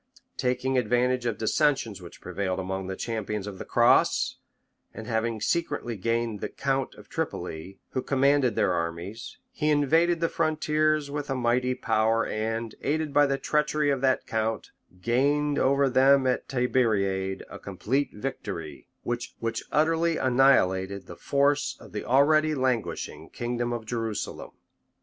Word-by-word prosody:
Taking 125 +1 +1
advantage 125 +2 +1
of 115 - -1
dissensions 115 -4 +1
which 85 - -12
prevailed 95 +1 -3
among 95 0 -3
the 95 - -4
champions 105 -3 -3
of 100 -2 -7
the - - -6
cross, - - +3 0.6
and 110 - -7
having 115 -1 -1
secretly 120 -3 -1
gained 115 +1 -1
the - - -3
count 135 -1 -2
of - - -15
Tripoli, 85 +5 -5
who 130 - -1
commanded 135 -3 +2
their 90 - +2
armies, 85 +6 -4
he 155 -12 -1
invaded 160 +4 +3
the 165 - +2
frontiers 155 -2 +1
with 145 0 -4
a 135 - 0
mighty 125 +1 +1
power 115 -2 +1
and, 110 +1 -3
aided 155 0 -1
by 145 0 +5
the 135 0 0
treachery 150 0 +1
of 135 -2 -1
that 130 -1 +2
count, 110 0 -2 0.3
gained 145 +4 +2
over 140 +1 +3
them 135 +1 +5
at 130 -1 0
Tiberiade 100 -7 0
a 100 - -10
complete 120 +9 -2
victory, 95 - -6 0.2
which 120 0 -4 0.4
utterly 165 +2 +2
annihilated 100 -8 +3
the - - -10
force 140 -2 +1
of - - -14
the 105 - -4
already 155 +4 +4
languishing 130 -4 -2
kingdom 120 0 -3
of 120 -2 -4
Jerusalem 115 -2 -3
{1187. - - -33
125 Hz, 145 wpm, -27 LUFS, 110-140 Hz, 0.6 s, by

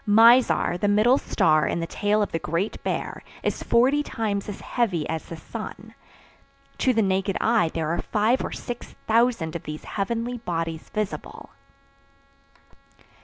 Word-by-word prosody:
Mizar, 225 -3 +5
the 205 - +1
middle 215 +6 +4
star 155 -2 +2
in - - -1
the 165 - -2
tail 205 +4 +1
of - - -4
the 165 - -1
Great 170 +7 -2
Bear, - - -3 0.2
is - - -1
forty 260 +5 +3
times 210 -7 -3
as 205 - -6
heavy 195 -11 -1
as 160 -1 -3
the 165 - -7
sun. - - -8 0.9
To 260 - +3
the 225 -3 +2
naked 190 0 0
eye 225 -7 +3
there 160 -2 -1
are 170 - -1
five 220 +4 +1
or - - -4
six 245 -1 -7
thousand 230 -8 +2
of 170 - -3
these 150 0 -7
heavenly 230 +4 -3
bodies 165 -5 -4
visible. 210 -2 -5
205 Hz, 155 wpm, -25 LUFS, 170-235 Hz, 0.9 s, Mizar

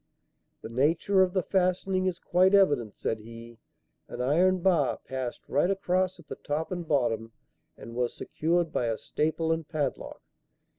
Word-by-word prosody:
"The - - -6
nature 160 - +2
of 185 -1 +2
the 185 -2 +1
fastening 185 0 +1
is 180 -2 -1
quite 185 +3 +3
evident," 145 - +3
said 110 - -2
he. 115 +1 -12 0.5
"An - - -8
iron 175 +8 +3
bar 170 -8 +2
passed 130 -2 -5
right 150 +5 +2
across 185 -1 0
at 160 - -16
the - - -7
top 155 +4 -3
and 175 -2 -4
bottom 115 -6 0 0.4
and 115 - -10
was 120 0 -1
secured 165 +1 -1
by 120 - 0
a 115 -1 -1
staple 160 +5 -1
and 160 -1 -2
padlock. 155 -3 -3
160 Hz, 160 wpm, -28 LUFS, 125-185 Hz, 0.5 s, quite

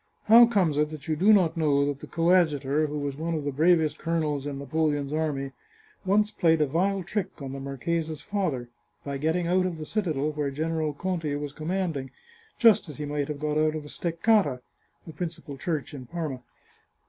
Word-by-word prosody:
How 230 +2 +8
comes 180 -10 +1
it 150 0 +2
that 155 0 -9
you 155 - 0
do 190 +8 +4
not 180 -6 +4
know 145 -3 +2
that 145 -1 -2
the - - -10
coadjutor, 155 -4 +2
who 150 0 -4
was 140 -1 -3
one 165 +2 -2
of 155 - -3
the 145 - -2
bravest 155 +1 +3
colonels 155 -4 -1
in 140 -1 -4
Napoleon's 145 0 -1
army, 145 -3 -1 0.5
once 210 +2 +3
played 165 -6 +3
a 150 - +4
vile 190 +7 0
trick 195 +1 -4
on 135 -2 -6
the 135 - -6
marchesa's 155 +3 -3
father, 180 -12 -2 0.4
by 140 -1 -4
getting 160 +4 0
out 185 +2 +2
of 175 -3 -5
the 155 - -6
citadel 155 -7 -1
where 150 -2 -2
General 155 +1 -2
Conti 165 -2 -2
was 145 -1 -5
commanding, 160 -4 -2 0.5
just 225 -8 +5
as 150 - -8
he 150 - -4
might 145 -1 -2
have 150 -2 -5
got 150 0 0
out 155 0 +2
of 155 - -4
the 145 - -11
Steccata 170 - +1 0.4
(the 160 - -9
principal 160 -3 -6
church 155 0 -3
in 130 -4 -8
Parma)." 150 -5 -4
155 Hz, 195 wpm, -27 LUFS, 145-170 Hz, 0.5 s, How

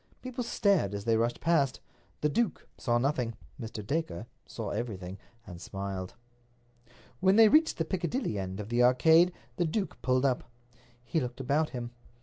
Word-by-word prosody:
People 255 -1 -4
stared 195 - +2
as 100 - -5
they 115 -1 +3
rushed 115 +2 0
past. 145 -6 +2 0.4
The 150 - +3
duke 225 +1 -1
saw 120 -1 +1
nothing. 125 -3 0 0.3
Mr. 110 -2 -6
Dacre 140 - -2 0.2
saw 110 -4 -5
everything, 100 -4 -4 0.3
and 90 -3 -10
smiled. 95 -1 -5 1.0
When 190 +5 +4
they 220 -1 +8
reached 315 +5 +4
the 165 - 0
Piccadilly 175 - -2
end 95 +1 -4
of 105 0 -6
the 120 +1 +2
Arcade 160 +8 +6 0.3
the 175 - +2
duke 190 +5 -2
pulled 130 +2 +2
up. 130 -3 0 0.5
He 120 +7 0
looked 125 -2 -4
about 145 +4 +1
him. 120 -1 -5
Mr. 120 0 -29
125 Hz, 165 wpm, -30 LUFS, 110-165 Hz, 1.0 s, they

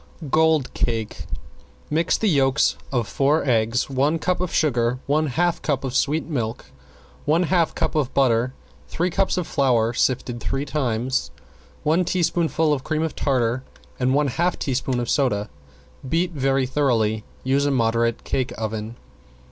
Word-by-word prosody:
~GOLD 160 -3 +3
CAKE~ 115 -2 -2 0.6
Mix 165 +3 +2
the 220 - 0
yolks 140 -4 +3 0.2
of 120 -5 0
four 145 +3 +1
eggs, 115 0 +2
one 140 +4 +1
cup 180 +2 -1
of 180 - -2
sugar, 125 -5 +1
one 155 +2 +1
half 170 +6 0
cup 140 -4 -1
of 130 -2 -3
sweet 150 +3 +1
milk, 120 -7 -3 0.6
one 160 +4 +3
half 170 -2 +1
cup - - -1
of 145 -5 0
butter, 125 -2 +2 0.4
three 175 +2 -1
cups 190 +2 +1
of 180 - -1
flour 120 -6 +2
sifted 120 -1 0
three 135 +4 -2
times, 130 -2 -1 0.5
one 160 +4 +3
teaspoonful 165 -3 +1
of 135 -3 -2
cream 155 +1 -1
of 160 - -3
tartar 125 -3 0 0.4
and 130 +1 +2
one 145 -1 +2
half 170 +7 0
teaspoon 130 -1 -1
of 120 - -2
soda. 105 - 0 0.6
Beat 170 +4 +1
very 135 -3 +1
thoroughly. 115 -6 +1 0.2
Use 140 +2 +2
a - - +2
moderate 115 -2 +1
cake 130 -2 -1
oven. 110 +1 -4
135 Hz, 155 wpm, -23 LUFS, 120-155 Hz, 0.6 s, ~GOLD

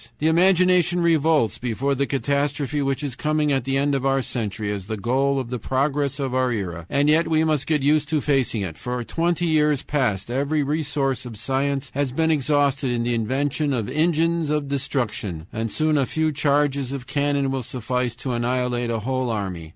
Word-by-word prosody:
"The 150 - -3
imagination 180 0 +4
revolts 160 - +2
before 125 +3 -1
the 140 +1 0
catastrophe 145 +1 -1
which 135 +1 -1
is 135 -4 -3
coming 150 +1 0
at 135 -3 0
the 135 0 0
end 140 +1 +1
of 135 -1 0
our 135 -1 +2
century 105 -4 -3
as 100 -2 -5
the 110 0 -3
goal 135 +6 +1
of 125 -2 -5
the 125 - -2
progress 140 +3 0
of 135 -3 -3
our 130 -1 +1
era, 90 -6 -4
and 140 +1 +2
yet 160 +3 +4
we 160 -1 +2
must 155 -3 0
get 150 -3 +1
used 150 +1 +2
to 155 - +1
facing 135 -7 0
it. 80 -4 -6
For 125 0 -3
twenty 170 +6 0
years 150 -3 +2
past 120 -8 -1
every 145 +4 0
resource 145 -3 -1
of 115 -3 -9
science 135 +4 -1
has 140 -1 -1
been 160 +4 +1
exhausted 140 -2 +1
in 120 -1 0
the 120 0 0
invention 135 +6 0
of 115 -5 -1
engines 165 0 +1
of 150 -1 0
destruction, 120 - -2
and 115 0 -2
soon 155 +2 +1
a 135 - +1
few 160 0 0
charges 140 -2 +1
of 135 -2 -5
cannon 140 0 0
will 135 -1 -1
suffice 125 0 -2
to 125 +2 -4
annihilate 120 0 -1
a 115 -2 -1
whole 130 +2 -1
army. 95 -7 -4
135 Hz, 195 wpm, -23 LUFS, 125-150 Hz, -, imagination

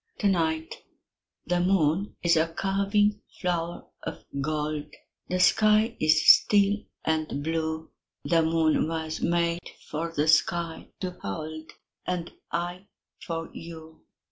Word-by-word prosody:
To 205 - +1
night 160 -4 0 0.6
The 175 +1 +1
moon 180 +1 +1
is 170 -1 +4
a 160 +1 +3
curving 200 +3 +1 0.2
flower 175 -1 -2 0.2
of - - -7 0.2
gold, 150 0 -2 0.4
The 185 - 0
sky 215 +4 +4
is 155 0 +4
still 205 0 +6 0.3
and 155 -3 -1
blue; 160 0 -2 0.3
The 165 -1 +3
moon 160 -1 +2
was 160 -1 -3
made 170 0 +1 0.3
for 165 +2 -2
the 150 -1 0
sky 165 +1 +2
to 185 -1 -2
hold, 155 +10 -6 0.3
And 180 -2 -2 0.2
I 175 +3 -3 0.3
for 165 -1 -5
you. 160 -1 -10
165 Hz, 120 wpm, -27 LUFS, 160-180 Hz, 0.6 s, still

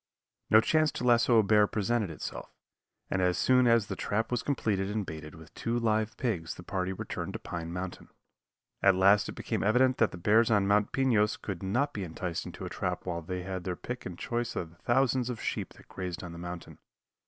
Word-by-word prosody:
No 110 - +7
chance 155 +6 +2
to - - -4
lasso 120 -1 +4
a 110 - +6
bear 105 0 +4
presented 105 0 0
itself, 80 - -6 0.6
and 95 - +1
as 90 -1 +2
soon 125 -1 +4
as 115 -3 +4
the - - -5
trap 110 +3 -1
was 125 -1 0
completed 105 -8 -1
and 105 -1 -2
baited 80 -2 -8
with 80 +1 -14
two 115 +1 -2
live 110 -2 0
pigs 95 -10 -2
the 90 - -11
party 95 0 -2
returned 95 - -5
to - - -3
Pine 85 -1 -5
Mountain. 90 +1 -6 0.7
At 95 -1 +5
last 100 +2 +4
it - - -5
became - - -2
evident 125 +4 +3
that 110 - +4
the - - -9
bears 110 +6 +4
on 105 -3 +3
Mount 105 +1 +2
Pinos 115 -6 +2
could 95 -4 -6
not 125 +10 0
be 100 - -4
enticed 85 0 -4
into - - -7
a - - -3
trap 90 -1 -3
while 85 -2 -3
they 90 +2 -5
had 95 -1 -4
their 90 -1 -3
pick 125 +7 -6
and 90 -2 -8
choice 120 +2 -3
of 85 -2 -4
the 85 - -21
thousands 125 +1 +1
of 120 -3 -4
sheep - - -3
that - - -18
grazed 90 -2 -5
on 90 - -7
the 85 - -9
mountain. 90 0 -8
105 Hz, 220 wpm, -30 LUFS, 90-120 Hz, 0.7 s, No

